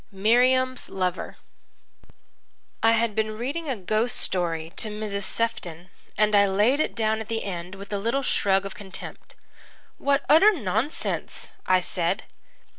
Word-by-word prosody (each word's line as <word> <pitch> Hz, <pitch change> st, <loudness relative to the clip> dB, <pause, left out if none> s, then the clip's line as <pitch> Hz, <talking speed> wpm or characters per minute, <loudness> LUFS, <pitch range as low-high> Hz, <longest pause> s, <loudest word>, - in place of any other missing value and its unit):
Miriam's 250 Hz, +6 st, +2 dB
Lover 185 Hz, -1 st, -3 dB, 1.4 s
I 225 Hz, 0 st, +5 dB
had 230 Hz, -1 st, +1 dB
been 215 Hz, 0 st, -1 dB
reading 285 Hz, +7 st, -3 dB
a 265 Hz, -, 0 dB
ghost 215 Hz, +5 st, 0 dB
story 165 Hz, -3 st, 0 dB
to 220 Hz, -, +1 dB
Mrs. 210 Hz, -1 st, -4 dB
Sefton, 180 Hz, -7 st, -2 dB, 0.3 s
and 215 Hz, +1 st, +3 dB
I 200 Hz, 0 st, +6 dB
laid 210 Hz, +9 st, +2 dB
it -, -, 0 dB
down 220 Hz, -1 st, +1 dB
at 220 Hz, -, -6 dB
the 225 Hz, -1 st, -2 dB
end 180 Hz, -1 st, -5 dB
with 200 Hz, +1 st, -9 dB
a 200 Hz, -, 0 dB
little 235 Hz, +7 st, 0 dB
shrug 195 Hz, -5 st, +1 dB
of 195 Hz, -, -6 dB
contempt. 200 Hz, -3 st, -9 dB, 0.6 s
"What 280 Hz, 0 st, +1 dB
utter 385 Hz, +9 st, +7 dB
nonsense!" 225 Hz, -, -2 dB, 0.2 s
I 185 Hz, 0 st, +4 dB
said. 180 Hz, +3 st, -1 dB
215 Hz, 145 wpm, -25 LUFS, 190-240 Hz, 1.4 s, utter